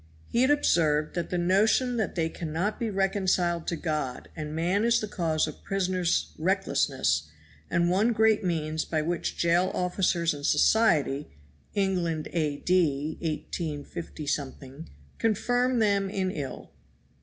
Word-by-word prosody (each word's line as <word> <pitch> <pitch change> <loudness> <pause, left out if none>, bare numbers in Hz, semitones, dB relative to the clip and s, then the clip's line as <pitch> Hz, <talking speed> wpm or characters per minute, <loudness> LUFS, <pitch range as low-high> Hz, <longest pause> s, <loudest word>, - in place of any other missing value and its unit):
He 235 - +1
had 260 - +4
observed 155 - +2
that 175 -1 -3
the 180 - -1
notion 215 +8 +2
that 220 - -1
they 165 -2 +1
cannot 165 +5 -3
be 230 - -1
reconciled 190 -4 0
to 170 - 0
God 155 -6 -3
and 155 -1 -5
man 180 +6 +1
is 235 0 +3
the 215 - -4
cause 165 -6 0
of 155 - -9
prisoners' 180 - 0
recklessness, 75 +2 +1 0.4
and 170 0 +2
one 200 +7 +3
great 220 -2 +3
means 160 -3 -1
by 155 -2 -1
which 170 +1 -2
jail 170 +2 +2
officers 180 -2 +1
and 145 -1 -8
society, 150 -9 +3 0.5
England 180 -6 0
A.D. 155 -1 0
185, 150 -2 -4 0.3
confirm 245 +3 +1
them 200 -3 +2
in 190 -1 -1
ill. 140 -7 -6
175 Hz, 130 wpm, -27 LUFS, 155-195 Hz, 0.5 s, had